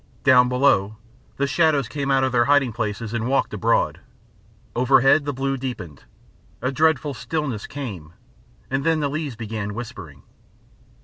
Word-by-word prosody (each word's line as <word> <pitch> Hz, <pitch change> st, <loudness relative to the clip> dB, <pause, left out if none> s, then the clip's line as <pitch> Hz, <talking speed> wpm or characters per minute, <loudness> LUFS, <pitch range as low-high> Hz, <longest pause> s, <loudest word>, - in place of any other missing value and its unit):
Down 125 Hz, -2 st, +6 dB
below 110 Hz, -6 st, +2 dB, 0.4 s
the 140 Hz, -, +1 dB
shadows 145 Hz, -3 st, +2 dB
came 140 Hz, +2 st, -3 dB
out 135 Hz, -1 st, +3 dB
of 130 Hz, -, +1 dB
their 120 Hz, -1 st, +3 dB
hiding 140 Hz, -3 st, +3 dB
places 110 Hz, 0 st, -4 dB
and 115 Hz, 0 st, -2 dB
walked 135 Hz, +1 st, 0 dB
abroad. -, -, +1 dB, 0.8 s
Overhead 135 Hz, +4 st, +4 dB
the 145 Hz, -, -1 dB
blue 135 Hz, 0 st, -2 dB
deepened. 105 Hz, -, -7 dB, 0.5 s
A 130 Hz, +2 st, -1 dB
dreadful 150 Hz, -1 st, +1 dB
stillness 135 Hz, -3 st, -4 dB
came, 100 Hz, -, -7 dB, 0.6 s
and 135 Hz, +1 st, 0 dB
then 160 Hz, 0 st, +2 dB
the 145 Hz, -2 st, 0 dB
leaves 150 Hz, -4 st, -3 dB
began 110 Hz, -2 st, -5 dB
whispering. 95 Hz, -, -8 dB
130 Hz, 145 wpm, -22 LUFS, 110-140 Hz, 0.8 s, Down